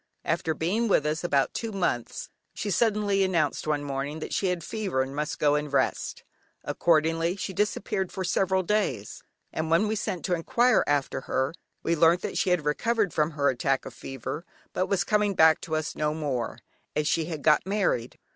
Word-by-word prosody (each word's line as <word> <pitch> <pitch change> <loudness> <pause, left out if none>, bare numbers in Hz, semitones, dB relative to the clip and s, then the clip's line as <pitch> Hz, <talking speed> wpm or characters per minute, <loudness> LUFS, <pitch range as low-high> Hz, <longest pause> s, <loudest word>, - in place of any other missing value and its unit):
After 165 -1 0
being 210 +9 0
with 155 -7 +3
us 155 +2 -1
about 140 -6 +1
two 230 -1 -3
months 175 - -2 0.3
she 205 - -3
suddenly 205 -2 +2
announced 175 -5 0
one 150 -1 0
morning 140 +2 -3
that 160 - -6
she 195 - +1
had 180 -2 -1
fever 190 -10 -1
and 135 +1 -7
must 150 +2 -2
go 145 -1 +3
and 150 -1 -1
rest. 140 - 0 0.4
Accordingly 165 +1 +2
she 195 -1 -4
disappeared 195 -1 -1
for 190 - -4
several 190 +1 +1
days, 170 - -1 0.3
and 160 0 -2
when 170 +6 +3
we 215 - 0
sent 195 -4 -3
to 180 - 0
enquire 240 +9 +3
after 145 -2 0
her 130 +4 0 0.3
we 170 - +1
learnt 165 +2 +4
that - - -3
she - - +1
had 180 -4 +1
recovered 210 +6 +1
from 150 0 +2
her 140 -1 +2
attack 135 +1 0
of - - -8
fever, 135 +4 -6 0.3
but 185 - 0
was 195 -3 +1
coming 210 -2 +1
back 160 -1 +5
to 160 - -3
us 155 -1 -2
no 150 0 0
more, 135 -7 -2 0.4
as 150 -1 +1
she 165 -1 +1
had 155 -4 -5
got 155 +3 +4
married. 195 - 0
165 Hz, 195 wpm, -27 LUFS, 150-195 Hz, 0.4 s, back